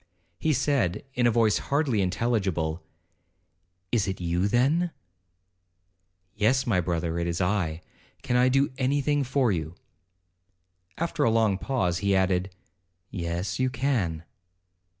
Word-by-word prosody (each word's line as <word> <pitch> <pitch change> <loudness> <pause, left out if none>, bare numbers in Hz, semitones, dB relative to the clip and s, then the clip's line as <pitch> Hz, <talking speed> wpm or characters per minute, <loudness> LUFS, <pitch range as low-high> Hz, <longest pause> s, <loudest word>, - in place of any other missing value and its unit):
He 160 - +1
said, 135 - 0
in 125 -2 +2
a - - +5
voice 110 -2 +3
hardly 140 -7 0
intelligible, 95 -5 -1 1.1
'It 110 -5 +1
is 95 0 -3
you, 90 +2 0
then?' 140 +11 +2 1.4
'Yes, 110 +5 +2
my 95 -7 +2
brother, 85 -1 -2
it 85 - -1
is 85 0 -2
I—can 90 +5 -3
I 125 +1 +4
do 135 +1 +2
any 135 +2 +1
thing 145 0 +1
for 130 -2 +1
you?' 80 -2 -3 1.2
After 170 0 -1
a - - +4
long 110 -4 +2
pause, 95 -11 0
he 100 +1 +1
added, 95 0 +1 0.6
'Yes, 85 +2 -3
you 130 - +2
can.' 120 - -1
105 Hz, 130 wpm, -26 LUFS, 90-130 Hz, 1.4 s, a